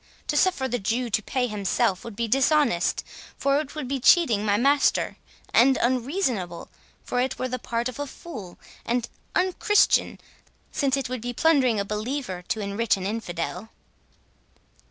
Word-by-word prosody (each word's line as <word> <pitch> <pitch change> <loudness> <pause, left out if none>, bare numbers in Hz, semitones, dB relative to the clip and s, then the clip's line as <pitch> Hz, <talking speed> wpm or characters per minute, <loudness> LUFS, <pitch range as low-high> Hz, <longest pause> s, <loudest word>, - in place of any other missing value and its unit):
To - - 0
suffer 295 -4 +2
the 245 -1 -2
Jew 230 +4 -1
to 215 - +1
pay 250 +4 -1
himself 210 -2 0
would 230 -3 -8
be 230 +2 -1
dishonest, 270 - +2 0.3
for 275 +1 +2
it 300 -1 -6
would 300 -4 -4
be 275 +1 -2
cheating 245 - +4
my 205 -1 +2
master; 280 +4 +2 0.4
and 260 +3 +5
unreasonable, 245 - -1 0.3
for 245 - -2
it 260 +1 -1
were 255 - -2
the 255 0 -4
part 235 +1 -2
of 255 +2 -7
a 290 - -3
fool; 235 - -9 0.3
and 240 0 -1 0.3
unchristian, 375 +3 +2 0.5
since 275 -1 +1
it 270 - -2
would 250 -2 -4
be 245 +1 -4
plundering 260 -6 +3
a 200 - -1
believer 210 -2 -3
to 220 - -1
enrich 200 +2 0
an 190 - -5
infidel." 195 -1 -4
245 Hz, 160 wpm, -25 LUFS, 210-275 Hz, 0.5 s, and